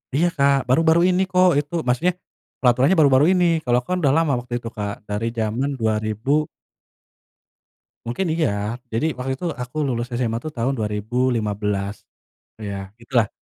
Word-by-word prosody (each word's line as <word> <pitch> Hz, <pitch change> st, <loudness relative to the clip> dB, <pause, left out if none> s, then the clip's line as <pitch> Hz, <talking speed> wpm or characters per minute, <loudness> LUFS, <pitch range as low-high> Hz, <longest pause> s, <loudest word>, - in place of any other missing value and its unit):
Iya, 170 Hz, +4 st, +3 dB
Kak, 140 Hz, -2 st, +3 dB
baru-baru 160 Hz, +6 st, +4 dB
ini 185 Hz, +1 st, +2 dB
kok 180 Hz, -1 st, +4 dB
itu 145 Hz, +3 st, -6 dB
maksudnya, 130 Hz, +9 st, +1 dB, 0.5 s
peraturannya 130 Hz, +8 st, +4 dB
baru-baru 140 Hz, -2 st, +5 dB
ini. 180 Hz, -1 st, +3 dB, 0.2 s
Kalau 125 Hz, -4 st, +2 dB
aku -, -, -28 dB
kan -, -, +1 dB
udah 140 Hz, -2 st, +3 dB
lama 160 Hz, -3 st, +2 dB
waktu 120 Hz, 0 st, -10 dB
itu, 115 Hz, -1 st, -6 dB
Kak, 105 Hz, 0 st, -5 dB
dari 105 Hz, +3 st, -2 dB
zaman 115 Hz, +5 st, -1 dB
2000 110 Hz, +7 st, 0 dB, 1.6 s
Mungkin 145 Hz, +11 st, -2 dB
iya. 115 Hz, -7 st, -1 dB
Jadi 155 Hz, +9 st, 0 dB
waktu 130 Hz, +1 st, -2 dB
itu 175 Hz, -, -7 dB
aku 125 Hz, +2 st, -7 dB
lulus 120 Hz, -3 st, -2 dB
SMA 115 Hz, -2 st, -1 dB
tuh 155 Hz, +5 st, -6 dB
tahun 120 Hz, +3 st, 0 dB
2015, 105 Hz, -2 st, -1 dB, 0.5 s
ya 100 Hz, -2 st, -6 dB
gitulah. 115 Hz, -2 st, +1 dB
125 Hz, 150 wpm, -22 LUFS, 110-145 Hz, 1.6 s, baru-baru